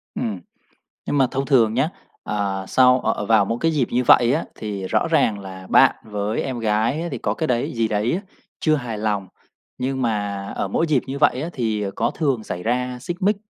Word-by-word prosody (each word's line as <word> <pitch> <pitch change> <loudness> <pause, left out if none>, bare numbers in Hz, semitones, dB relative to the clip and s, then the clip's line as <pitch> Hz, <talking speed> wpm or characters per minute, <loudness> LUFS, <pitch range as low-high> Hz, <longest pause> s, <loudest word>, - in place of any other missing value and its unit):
Ừm. 105 -5 -3 0.7
Nhưng 145 - 0
mà 135 - +5
thông 135 +1 -2
thường 115 -6 +4
nhá, 135 +5 +2 0.3
ờ, 100 -2 -2
sau 125 0 +5
ờ, - - +1
ờ, 105 - -4
vào 110 -2 +4
mỗi 115 +4 -2
cái 165 - +2
dịp 140 -6 +1
như 125 +1 +1
vậy 120 +1 +6
á 155 - 0
thì 100 -3 -5
rõ - - +1
ràng 105 -2 +2
là 95 -1 -9
bạn - - +5
với 105 0 -2
em 130 -2 -4
gái 115 +9 0
thì 130 - -4
có 105 -1 -1
cái 160 - -2
đấy 120 -4 0
gì 115 -1 +1
đấy 105 +2 0
á 180 - -1 0.4
chưa 155 -1 +3
hài 120 -6 -4
lòng, 105 -3 -1 0.5
nhưng 130 +1 -2
mà 105 -4 -1
ở 95 - -1
mỗi 165 +11 +1
dịp 145 -5 +2
như 135 +1 -4
vậy 130 +1 +3
á 170 - -4
thì 110 -6 -1
có - - +1
thường 135 -8 -1
xảy 90 -2 -5
ra 125 +2 -1
xích 170 +7 -4
mích 205 +2 +3
115 Hz, 220 wpm, -22 LUFS, 105-135 Hz, 0.7 s, vậy